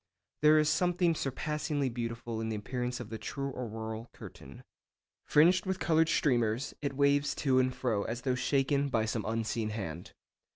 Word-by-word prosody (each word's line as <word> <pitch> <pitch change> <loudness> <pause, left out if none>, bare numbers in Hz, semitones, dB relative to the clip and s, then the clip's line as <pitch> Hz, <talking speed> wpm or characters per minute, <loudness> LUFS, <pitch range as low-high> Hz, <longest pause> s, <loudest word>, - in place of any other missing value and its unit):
There 150 +1 +6
is 155 -1 +3
something 175 +1 +2
surpassingly 150 0 -2
beautiful 115 -1 -4
in 110 - -2
the 110 - -2
appearance 125 +3 -3
of - - -7
the 110 - -5
true 140 +6 -4
'auroral 110 -1 -5
curtain.' 65 0 -12 0.6
Fringed 175 +5 +4
with 190 0 0
coloured 160 0 +3
streamers, 120 -4 +1
it 140 -2 -2
waves 140 +1 +2
to 130 -3 +2
and 130 0 +2
fro 115 -5 -1
as 120 +2 -4
though 130 - +1
shaken 140 +2 +1
by 110 -4 +1
some 110 -1 -2
unseen 115 0 -1
hand. 90 -6 -6
130 Hz, 165 wpm, -31 LUFS, 115-145 Hz, 0.6 s, There